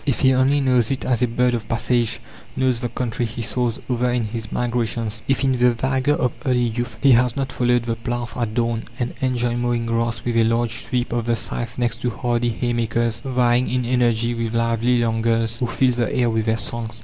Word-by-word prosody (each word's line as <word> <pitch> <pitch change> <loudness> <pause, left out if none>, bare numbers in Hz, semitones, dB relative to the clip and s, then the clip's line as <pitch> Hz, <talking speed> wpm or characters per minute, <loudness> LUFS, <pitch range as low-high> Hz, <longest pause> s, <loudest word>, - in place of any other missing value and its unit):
If 135 - -1
he 130 0 +5
only 135 +3 +3
knows 125 -4 +2
it 135 - -2
as 125 -2 +1
a 125 - +3
bird 125 +1 +1
of 115 -2 -3
passage 120 0 0 0.3
knows 130 -2 +1
the 120 0 -3
country 120 -1 -3
he 115 0 -3
soars 120 0 -1
over 125 0 0
in 120 -1 0
his 110 0 -5
migrations? 115 -2 -2
If, 135 0 +1
in 135 - +3
the 125 -1 +3
vigour 130 +4 +1
of 125 - 0
early 125 -4 +1
youth, 120 -2 -3
he 140 - +7
has 125 0 +4
not 135 -2 -2
followed 120 -1 +1
the 115 -1 -2
plough 120 +1 -3
at 115 -3 -2
dawn, 115 -1 0
and 120 -2 -2
enjoyed 120 -2 0
mowing 120 -1 0
grass 115 -1 -1
with 120 -1 0
a 115 - +5
large 115 0 +1
sweep 125 -2 -1
of 120 -1 -1
the 120 - +2
scythe 120 +1 -4
next 120 -1 -1
to 125 - 0
hardy 120 0 -1
haymakers 115 -1 -1
vying 125 -2 +2
in 125 -1 0
energy 120 -1 +1
with 115 -1 -3
lively 115 +1 +2
young 115 -1 +1
girls 115 0 0
who 125 - 0
fill 125 +2 +2
the 120 -2 -1
air 120 -2 +1
with 110 0 -1
their 110 0 +2
songs? 115 +1 -4
120 Hz, 220 wpm, -21 LUFS, 115-125 Hz, 0.3 s, he